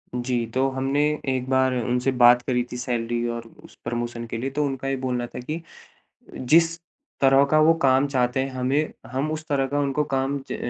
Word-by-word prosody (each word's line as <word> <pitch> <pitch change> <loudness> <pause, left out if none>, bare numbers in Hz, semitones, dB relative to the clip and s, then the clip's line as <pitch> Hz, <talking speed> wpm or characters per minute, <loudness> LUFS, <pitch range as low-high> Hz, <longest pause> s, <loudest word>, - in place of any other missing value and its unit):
जी, 120 -1 -1
तो 130 +1 +2
हमने 135 +2 -1 0.3
एक 130 -1 -1
बार 130 -1 +2
उनसे 125 +3 0
बात 120 0 +7
करी 125 -1 +1
थी 125 - -5
सैलरी 120 -1 -2
और 115 0 -4 0.2
उस - - -16
प्रमोशन 120 0 -4
के 115 - -4
लिए 130 +4 -3
तो 150 - +2
उनका 135 -1 -4
ये 135 - 0
बोलना 125 -1 -1
था - - -8
कि 155 +7 -5 0.7
जिस 165 +5 +3 0.4
तरह 135 0 +5
का 155 - +4
वो 160 +2 +5
काम 135 +1 +4
चाहते 130 -1 0
हैं 135 0 -2
हमे 130 +3 0 0.3
हम 140 +4 -1
उस 155 0 -5
तरह 135 -2 +1
का 145 +2 -2
उनको 140 +1 0
काम 135 +1 0
ज - - -2
130 Hz, 200 wpm, -24 LUFS, 125-140 Hz, 0.7 s, बात